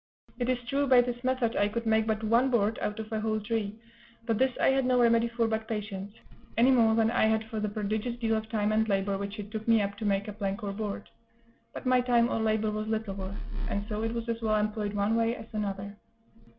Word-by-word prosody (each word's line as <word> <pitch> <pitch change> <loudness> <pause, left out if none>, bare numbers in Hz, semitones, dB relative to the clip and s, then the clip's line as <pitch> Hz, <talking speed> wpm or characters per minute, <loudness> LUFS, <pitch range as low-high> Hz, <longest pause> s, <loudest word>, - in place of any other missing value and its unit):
It 245 0 0
is 255 - +2
true, 280 +2 +1
by 255 -2 +7
this 245 0 -4
method 255 -3 0
I 205 - +3
could 230 +2 -3
make 220 0 +2
but 220 0 -1
one 235 +4 +3
board 225 -3 +1
out 210 +1 -2
of 220 0 -6
a 220 - -1
whole 215 0 0
tree; 215 -1 -2 0.5
but 225 -2 0
this 260 0 +3
I - - +4
had 270 0 +2
no 250 0 +3
remedy 235 -1 +4
for 230 -1 0
but 220 0 -2
patience, 205 -3 -4 0.5
any 245 +3 +5
more 225 -3 +4
than 225 0 +3
I 225 - +3
had 220 0 +2
for 220 - -2
the 210 0 -1
prodigious 215 +3 -2
deal 225 -2 +1
of 220 0 -3
time 215 -2 0
and 220 +1 +2
labor 195 0 +1
which 200 +1 -5
it 210 0 -7
took 220 0 -5
me 230 -1 +5
up 200 -1 -1
to 220 - -3
make 200 0 +1
a 210 - -5
plank 200 0 -3
or 200 - -2
board; 205 -1 -4 0.6
but - - -8
my 255 0 +4
time 240 -1 +3
or - - 0
labor 220 -1 +1
was 215 0 -3
little 220 -2 -2
worth, 195 0 -6 0.3
and 200 0 -2
so 215 0 -3
it 225 +1 -2
was 235 0 -3
as 230 0 -2
well 215 -1 +1
employed 210 -1 -1
one 205 +2 +1
way 230 +1 +1
as 220 - -9
another. 200 -1 -3
220 Hz, 250 wpm, -29 LUFS, 210-235 Hz, 0.6 s, by